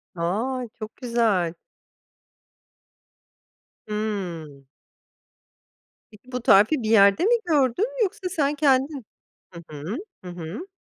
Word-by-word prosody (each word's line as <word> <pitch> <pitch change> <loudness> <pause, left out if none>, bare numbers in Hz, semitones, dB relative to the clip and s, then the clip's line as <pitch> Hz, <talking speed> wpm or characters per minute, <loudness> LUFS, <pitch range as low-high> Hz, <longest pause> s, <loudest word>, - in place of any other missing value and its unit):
A! 230 +9 -2
Çok 215 0 -8
güzel. 225 -9 +1 2.3
Hımm. 180 -10 -4 1.5
Peki 225 +5 -18
bu 250 - -3
tarifi 225 +6 +4
bir 215 - -2
yerde 200 - +5
mi 475 +3 +5
gördün 340 - +1
yoksa 380 -1 -3
sen 295 -3 0
kendin 275 -2 +1 0.5
Hı 170 - -9
hı. 155 - -5 0.3
Hı - - -6
hı. 175 - -7
225 Hz, 100 wpm, -24 LUFS, 185-280 Hz, 2.3 s, yerde